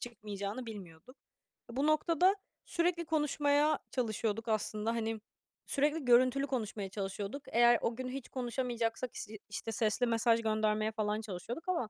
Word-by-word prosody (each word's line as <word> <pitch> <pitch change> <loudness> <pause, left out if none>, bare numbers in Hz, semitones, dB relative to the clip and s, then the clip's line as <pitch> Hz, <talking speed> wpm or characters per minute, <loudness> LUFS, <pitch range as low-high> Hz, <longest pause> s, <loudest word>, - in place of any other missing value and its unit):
çıkmayacağını 215 0 -5
bilmiyorduk. 195 - -10 0.5
Bu 270 +5 0
noktada 335 +5 +4 0.3
sürekli 340 -1 0
konuşmaya 295 -1 +2
çalışıyorduk 225 -2 -1
aslında. 215 0 0
Hani, 225 -1 -1 0.5
sürekli 295 +1 +1
görüntülü 255 +3 +5
konuşmaya 215 -6 -3
çalışıyorduk. 200 +7 -4
Eğer 240 0 +5
o 230 - 0
gün 255 0 -4
hiç 265 0 -6
konuşamayacaksak, 240 -2 -2
is - - -5 0.2
işte, 225 +2 -4
sesli 220 +3 +1
mesaj 230 0 +3
göndermeye 215 0 +1
falan 215 0 -1
çalışıyorduk 225 - -6
ama 295 -12 0
235 Hz, 130 wpm, -33 LUFS, 215-275 Hz, 0.5 s, görüntülü